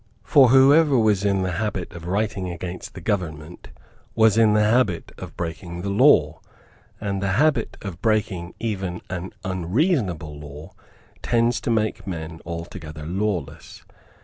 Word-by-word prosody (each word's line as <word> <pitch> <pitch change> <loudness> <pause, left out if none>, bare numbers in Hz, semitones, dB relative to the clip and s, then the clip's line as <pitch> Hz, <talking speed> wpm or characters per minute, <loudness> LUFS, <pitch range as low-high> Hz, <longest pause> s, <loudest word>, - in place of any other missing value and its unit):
For 135 +3 +6
whoever 140 +3 +6
was 105 -4 +2
in 100 -2 +1
the 90 - -1
habit 95 -1 -3
of 85 -1 -9
writing 100 -1 -1
against 90 +1 -7
the 90 - -8
government 85 -4 -4 0.5
was 110 -2 +4
in 110 -2 +4
the 105 - +4
habit 105 -5 +1
of - - -9
breaking 85 +1 -5
the 100 - -2
law; 100 - +4 0.6
and 100 -2 -3
the 100 -1 0
habit 140 0 +1
of 95 -4 -7
breaking 100 -6 -1
even 95 -6 -3
an 90 0 -4
unreasonable 95 - -1
law 75 +2 -10 0.5
tends 120 0 +1
to - - -3
make 110 -3 -1
men 80 -2 -6
altogether 85 -2 -7
lawless. 95 +2 -4
95 Hz, 145 wpm, -23 LUFS, 85-110 Hz, 0.6 s, For